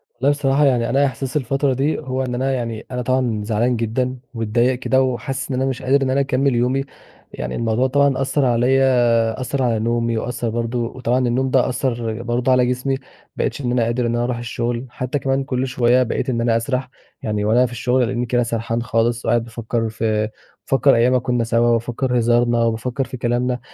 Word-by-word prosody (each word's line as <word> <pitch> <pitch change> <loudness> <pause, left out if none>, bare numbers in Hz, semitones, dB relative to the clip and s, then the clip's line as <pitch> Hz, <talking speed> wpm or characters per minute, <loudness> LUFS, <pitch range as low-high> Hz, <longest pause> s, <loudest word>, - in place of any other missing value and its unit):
والله 130 +4 +1
بصراحة 145 0 +2
يعني 120 -3 +2
أنا 140 +3 +3
إحساسي 135 +2 -2
الفترة 135 +2 0
دي، 140 +4 0
هو 130 -2 -3
إن 125 -1 -3
أنا 135 +2 0
يعني 115 -3 -4
أنا 125 -1 -2
طبعًا 125 -4 0
زعلان 115 +3 +1
جدًا 125 +3 -1 0.2
ومتضايق 120 +3 +1
كده 130 0 +2
وحاسس 130 +1 -2
إن 130 - -1
أنا 130 +1 0
مش 130 0 -4
قادر 135 +2 +2
إن 130 - 0
أنا 135 - +2
أكمّل 135 -1 +1
يومي. 125 +3 +1 0.5
يعني 60 +1 -4
الموضوع 115 +3 +1
طبعًا 140 0 +2
أثّر 135 +1 +1
عليّا، 120 -2 +2
أثّر 135 +1 -1
على 115 -3 +1
نومي 115 0 0
وأثّر 120 0 -3
برضه 115 +1 -2 0.2
وطبعًا 125 -1 0
النوم 130 +2 0
ده 130 -2 +3
أثّر 120 -3 -2
برضه 120 +2 0
على 125 -1 +4
جسمي، 125 +2 -1 0.4
بقيتش - - -2
إن 120 -1 -1
أنا 120 -2 +2
قادر 120 +1 0
إن 120 - 0
أنا 120 - 0
أروح 120 -1 -1
الشغل. 120 +1 -3
حتّى 125 +3 -3
كمان 135 0 0
كل 130 -1 -2
شوية 125 0 +3
بقيت 125 - -2
إن 120 -2 0
أنا 115 -1 +2
أسرح. 130 +2 -2 0.3
يعني 105 -1 -2
وأنا 120 +4 +4
في 120 - -5
الشغل 125 +1 +1
ألاقيني 120 0 -1
كده 120 0 +1
سرحان 115 0 -2
خالص 115 +1 0
وقاعد 120 -1 +2
بافكّر 115 -1 -3
في 110 -1 -1 0.4
بافكّر 135 -1 +5
أيام 120 +2 +3
ما 130 - +4
كُنّا 125 -1 0
سوا 115 +1 +2
وافكّر 120 +2 0
هزارنا 120 0 +2
وبافكّر 115 +4 -1
في 130 - -7
كلامنا. 125 +1 0
125 Hz, 200 wpm, -20 LUFS, 115-130 Hz, 0.5 s, بافكّر